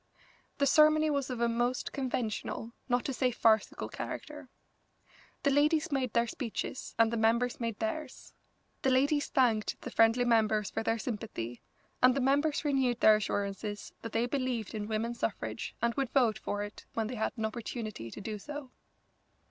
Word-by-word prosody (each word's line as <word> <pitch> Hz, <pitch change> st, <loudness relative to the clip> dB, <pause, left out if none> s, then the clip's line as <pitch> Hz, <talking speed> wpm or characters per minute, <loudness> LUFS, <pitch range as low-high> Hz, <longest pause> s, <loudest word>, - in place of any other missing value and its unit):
The 280 Hz, -, +3 dB
ceremony 310 Hz, +2 st, +5 dB
was 280 Hz, -2 st, -1 dB
of 245 Hz, -2 st, -3 dB
a 235 Hz, -, +4 dB
most 240 Hz, +2 st, 0 dB
conventional, 235 Hz, -3 st, -3 dB, 0.2 s
not 245 Hz, 0 st, +1 dB
to 275 Hz, -, -1 dB
say 255 Hz, +1 st, +2 dB
farcical 225 Hz, -3 st, +2 dB
character. 295 Hz, -3 st, -7 dB, 0.9 s
The 280 Hz, -, +3 dB
ladies 305 Hz, +3 st, +3 dB
made 260 Hz, -4 st, 0 dB
their 235 Hz, 0 st, +3 dB
speeches 235 Hz, +1 st, -5 dB
and 225 Hz, 0 st, +4 dB
the -, -, 0 dB
members 235 Hz, +2 st, +2 dB
made 230 Hz, -3 st, -2 dB
theirs. 265 Hz, +5 st, -4 dB, 0.5 s
The 265 Hz, -, +2 dB
ladies 285 Hz, +3 st, +3 dB
thanked 230 Hz, -5 st, +1 dB
the -, -, -6 dB
friendly 225 Hz, +2 st, +4 dB
members 215 Hz, -3 st, +2 dB
for -, -, -2 dB
their 225 Hz, 0 st, 0 dB
sympathy, 210 Hz, -, -5 dB, 0.4 s
and 255 Hz, 0 st, +6 dB
the -, -, +1 dB
members 285 Hz, +4 st, +2 dB
renewed 265 Hz, -4 st, +2 dB
their 215 Hz, -2 st, +7 dB
assurances 205 Hz, 0 st, -3 dB
that 230 Hz, -, -6 dB
they 230 Hz, +2 st, +1 dB
believed 250 Hz, -5 st, -2 dB
in 210 Hz, -1 st, -3 dB
women's 225 Hz, +2 st, -2 dB
suffrage -, -, -3 dB
and 235 Hz, 0 st, +2 dB
would 270 Hz, -1 st, -1 dB
vote 240 Hz, -5 st, +2 dB
for 205 Hz, 0 st, -3 dB
it 205 Hz, 0 st, -9 dB
when 225 Hz, -, 0 dB
they 230 Hz, -, -4 dB
had 220 Hz, -3 st, -1 dB
an 220 Hz, -, -1 dB
opportunity 220 Hz, -, -5 dB
to -, -, -9 dB
do 210 Hz, +1 st, -5 dB
so. 290 Hz, +2 st, -7 dB
235 Hz, 170 wpm, -31 LUFS, 220-270 Hz, 0.9 s, their